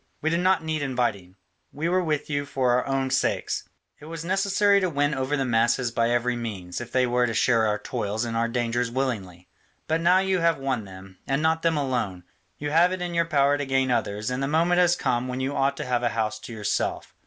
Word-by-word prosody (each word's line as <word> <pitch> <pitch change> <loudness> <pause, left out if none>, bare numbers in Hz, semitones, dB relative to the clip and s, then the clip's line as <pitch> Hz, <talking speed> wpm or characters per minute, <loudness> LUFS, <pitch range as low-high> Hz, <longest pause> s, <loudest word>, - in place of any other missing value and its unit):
We 160 - 0
did 170 - +1
not 185 -1 +2
need 160 -1 -2
inviting: 120 -9 -2 0.4
we 155 +3 -3
were 185 +1 +2
with 150 -3 -1
you 145 -1 -2
for 130 -3 +1
our 125 +2 +1
own 135 -1 -1
sakes. - - -1 0.3
It - - -12
was 165 0 -7
necessary 200 +2 +3
to 185 -2 0
win 145 -1 0
over 135 +2 -1
the 135 - 0
masses 120 +1 +1
by 115 0 +1
every 120 +1 +1
means, 100 -5 -5
if 120 0 -8
they 130 -1 +3
were 125 0 +1
to 115 - -3
share 115 -1 +3
our 105 0 +1
toils 105 +2 -3
and 115 -1 -4
our 115 +1 +1
dangers 120 0 -1
willingly. 105 -9 -3 0.4
But 160 +1 0
now 175 +2 +5
you 190 -1 +1
have 165 0 +2
won 130 -5 -2
them, 95 0 -13
and 135 +3 0
not 160 0 +2
them 165 -2 +1
alone; 120 -10 -2 0.3
you 145 0 -4
have 170 +3 +4
it 185 -1 -4
in 175 -1 -4
your 170 0 +2
power 145 -3 +2
to 145 - -2
gain 135 -1 +1
others, 110 0 -1
and 125 +1 -2
the 135 - 0
moment 170 +4 +2
has 175 -1 +4
come 125 -6 -1
when 125 0 -4
you 135 +2 -2
ought 135 0 +1
to - - -4
have 125 -1 0
a 120 - +1
house 110 -1 -2
to 115 - -10
yourself. 110 -2 -2
130 Hz, 235 wpm, -25 LUFS, 115-160 Hz, 0.4 s, now